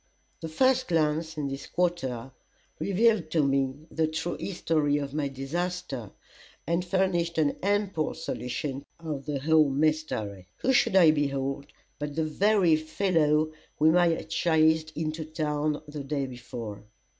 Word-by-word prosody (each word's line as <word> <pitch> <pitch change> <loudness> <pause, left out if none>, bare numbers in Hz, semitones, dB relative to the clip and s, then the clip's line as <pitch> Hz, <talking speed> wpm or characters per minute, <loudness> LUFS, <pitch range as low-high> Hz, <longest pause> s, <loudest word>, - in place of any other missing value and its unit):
The 160 - -6
first 255 +9 +2
glance 160 -1 0
in 145 -2 -1
this 135 0 -6
quarter 135 -9 -1 0.5
revealed 200 -3 +2
to 155 -1 +2
me 135 +1 0
the 160 -1 +1
true 160 +2 -3
history 155 -6 0
of 140 -1 -4
my 150 -1 0
disaster, 140 - -4 0.6
and 170 +2 0
furnished 175 -2 0
an 150 -3 +2
ample 200 -5 0
solution 135 -2 -4 0.2
of 150 -4 -5
the 145 -1 -1
whole 155 0 +4
mystery. 135 - -1
Who 265 - +1
should 220 - +3
I 170 -5 +8
behold 140 -2 -1 0.3
but 145 -1 -4
the 160 - +1
very 185 +1 +3
fellow 155 -2 +1 0.3
whom 160 +2 +4
I 175 -1 +5
had 165 -1 -2
chased 160 -1 +3
into 155 0 -2
town 155 -1 -2
the 145 -1 -6
day 140 0 -2
before. 120 -5 -7
155 Hz, 145 wpm, -28 LUFS, 140-170 Hz, 0.6 s, I